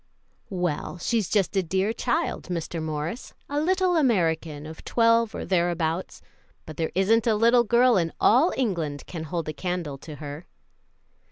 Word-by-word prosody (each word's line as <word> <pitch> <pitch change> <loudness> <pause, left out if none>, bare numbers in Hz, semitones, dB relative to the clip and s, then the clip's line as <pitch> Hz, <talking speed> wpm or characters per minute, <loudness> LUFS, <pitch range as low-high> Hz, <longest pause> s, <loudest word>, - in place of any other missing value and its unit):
"Well, 180 -3 -2
she's 215 +2 -1
just 200 -2 +1
a 190 - +3
dear 190 +5 0
child, 305 +9 -1
Mr. 170 -1 -4
Morris 155 - -4
a 290 +1 -1
little 370 +2 +2
American 165 - +1
of 160 +1 -10
twelve 230 -1 +2
or - - -4
thereabouts 175 -1 -1 0.4
but 155 - -9
there 160 -1 -1
isn't 215 +5 +3
a 220 - +4
little 235 +3 +5
girl 240 0 +4
in 165 -2 0
all 270 +11 +5
England 170 - -1
can 160 -3 -6
hold 165 +1 -3
a 155 - -3
candle 175 -7 -4
to 155 +1 -9
her." 145 +3 -8
180 Hz, 160 wpm, -25 LUFS, 160-230 Hz, 0.4 s, little